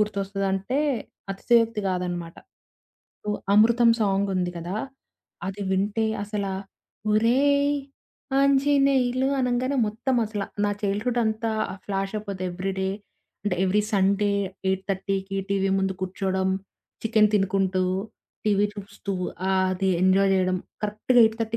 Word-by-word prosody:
గుర్తొస్తదంటే 195 +2 -1 0.5
అతిశయోక్తి 230 +2 +2
గాదనమాట. 175 -2 -3 0.9
సో, - - -8 0.3
'అమృతం' 230 +2 +6
సాంగ్ 200 -1 +2
ఉంది 180 -1 0
కదా! 175 +4 -4 0.7
అది 195 +1 -4
వింటే 205 +3 +1 0.2
అసలా, 200 -2 -3 0.6
ఒరేయ్! 280 +6 +3 0.6
ఆంజినేెలు 275 -2 +3
అనంగానే 250 +2 0
మొత్తం 245 +5 -1
అసల. 210 -1 -3 0.2
నా 205 - +2
చైల్డ్‌హుడ్ 210 +5 0
అంతా 220 +1 -1 0.3
ఫ్లాష్ 195 0 -2
అయిపోద్ది 200 -3 -5
ఎవ్రీడే. 190 +1 -2 0.5
అంటే 195 -3 0
ఎవ్రీ 200 +3 +2
సండే 200 +1 +2 0.4
8:30కి 195 0 -2
టీవీ 195 -1 +1
ముందు 190 0 0
కూర్చోడం. 190 0 -1 0.5
చికెను 220 -1 +4
తినుకుంటూ, 195 -1 +1 0.6
టీవీ 205 -1 +3
చూస్తూ 200 0 -6 0.4
ఆహ్, 190 -1 +3
అది 190 +1 0
ఎంజాయ్ 190 +1 +4
జేయడం. 185 -1 +2 0.3
కరెక్ట్‌గా 215 +4 +1
8:30 225 0 0
200 Hz, 110 wpm, -25 LUFS, 190-225 Hz, 0.9 s, అమృతం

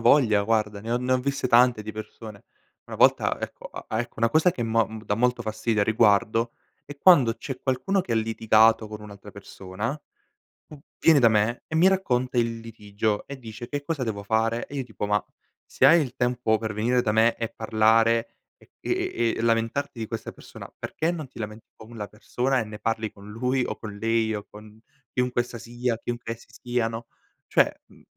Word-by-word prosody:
Avoglia 110 -8 +5
guarda 105 -1 0
ne 110 +3 -6
ho 120 - +2
ne 125 +1 -1
ho 130 - +3
viste 140 -1 -1
tante 120 -2 +5
di 110 +1 -6
persone. 110 -1 -9 0.4
Una - - -8
volta - - +3
ecco - - -7
a - - -9
a 110 - -1
ecco 120 0 -6
una 115 +1 +3
cosa 160 +5 +4
che 120 - -4
mo 115 -1 +2
m 110 0 -9
dà 105 - 0
molto 125 +2 +1
fastidio 110 0 -1
a 100 - +3
riguardo 110 +1 +2 0.3
è 145 - -10
quando 140 -12 +6
c'è 135 -2 -7
qualcuno 190 +9 0
che 125 -10 -4
ha - - +2
litigato 110 0 +3
con 105 0 -8
un'altra 105 -1 -11
persona, 100 +2 -6 0.8
v 150 - -11 0.2
viene 160 -3 +5
da 115 - +7
me 110 +2 +1
e 160 - -7
mi 175 +4 +6
racconta 130 -10 0
il 115 -1 0
litigio 105 -1 -3
e 140 - -8
dice: 115 -1 -9
"Che 145 +1 -3
cosa 160 -4 -2
devo 105 -3 -4
fare?" 115 +3 0
E 145 - -8
io 135 - -2
tipo: 110 -3 -5
"Ma 105 0 +1 0.4
se - - -1
hai 170 +1 +7
il 130 -5 -3
tempo 125 -3 +1
per 110 0 -4
venire 120 +4 +1
da 105 -3 0
me 110 +2 +4
e 115 -1 -3
parlare 115 +1 +2 0.2
e - - -24
e - - -2
e 115 -1 +1
e - - -3
lamentarti 115 +3 0
di 110 - -3
questa 115 0 -6
persona - - -12
perché 160 +2 -2
non 155 -5 -5
ti - - -14
lamenti 105 0 -7
con 110 +2 -13
la 105 - -4
persona 125 +5 -1
e - - -2
ne 105 0 -9
parli 115 -1 -2
con 100 +1 -13
lui 125 +4 0
o - - -4
con 105 -2 -8
lei 115 0 +1
o 105 - -5
con 105 0 -14 0.3
chiunque 125 -1 +1
essa 120 -1 -9
sia, 120 0 -3
chiunque 120 -1 -4
essi 115 - -11
siano." 115 -1 -3 0.4
Cioè, - - +3 0.2
mhmm, - - -20
115 Hz, 210 wpm, -25 LUFS, 110-125 Hz, 0.8 s, da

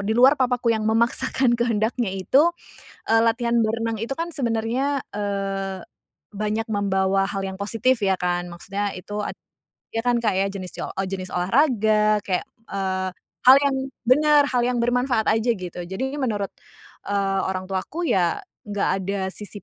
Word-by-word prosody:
di 220 - +1
luar 260 +3 +7
papaku 250 -2 +2
yang 220 -1 -1
memaksakan 235 +3 +2
kehendaknya 235 0 0
itu, 195 - +3 0.6
eee, 225 0 +5
latihan 235 +1 +1
berenang 225 +1 -1
itu 230 +5 -4
kan 335 +4 -3
sebenarnya, 260 -1 -1
eee, 195 -2 -3 0.5
banyak 215 +2 -2
membawa 195 -2 +1
hal 195 0 -3
yang 190 0 -4
positif 225 +3 +1
ya 195 - +3
kan, 175 0 0
maksudnya 195 +3 -3
itu 205 +3 -7
ed - - -4 0.6
iya 225 - +1
kan, 245 -1 +3
Kak, 220 -4 +1
ya, 195 - +2
jenis 185 -2 -6
ce - - -7
o - - -5
o 195 - -2
jenis 185 -1 -5
olahraga 215 - +3
kayak, 185 -2 0 0.2
eee, 190 -1 -2 0.4
hal 265 - +11
yang 275 -1 +2 0.3
bener 295 +4 +5
hal 245 - +2
yang 250 - 0
bermanfaat 245 -1 +1
aja 225 +2 +2
gitu, 180 -1 -7
jadi 190 +8 -3 0.2
menurut, 210 -6 -1 0.6
eee, 195 -1 0
orang 185 0 -3
tuaku 240 - -3
ya, 175 -3 +2 0.3
nggak 205 -1 0
ada 195 +1 -2
sisi 205 0 -8
215 Hz, 160 wpm, -23 LUFS, 195-240 Hz, 0.6 s, hal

